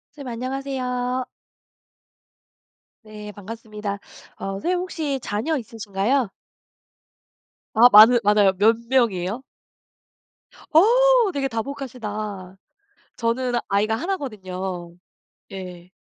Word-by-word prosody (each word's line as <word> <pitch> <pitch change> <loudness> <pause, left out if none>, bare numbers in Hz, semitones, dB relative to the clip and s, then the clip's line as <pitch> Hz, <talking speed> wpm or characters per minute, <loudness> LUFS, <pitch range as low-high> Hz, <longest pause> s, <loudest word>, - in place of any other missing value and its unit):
선생님 280 -3 -9
안녕하세요. 255 0 -3 1.8
네 210 -1 -9
반갑습니다. 210 0 -7 0.4
어 - - -7
선생님 350 - -1
혹시 315 -6 -3
자녀 230 +11 -1
있으신가요? 225 +1 -1 1.4
아 240 +2 +7
많으 225 +4 +9
많아요? 205 -2 +4
몇 225 +3 +4
명이에요? 225 -4 +1 1.3
어우 475 +5 +5
되게 275 -1 -1
다복하시다. 215 -7 -5 0.6
저는 245 +2 -1 0.2
아이가 210 +3 +1
1 375 +11 -2
거든요. 185 - -6 0.6
예. 180 -2 -9
225 Hz, 210 characters per minute, -23 LUFS, 205-270 Hz, 1.8 s, 많으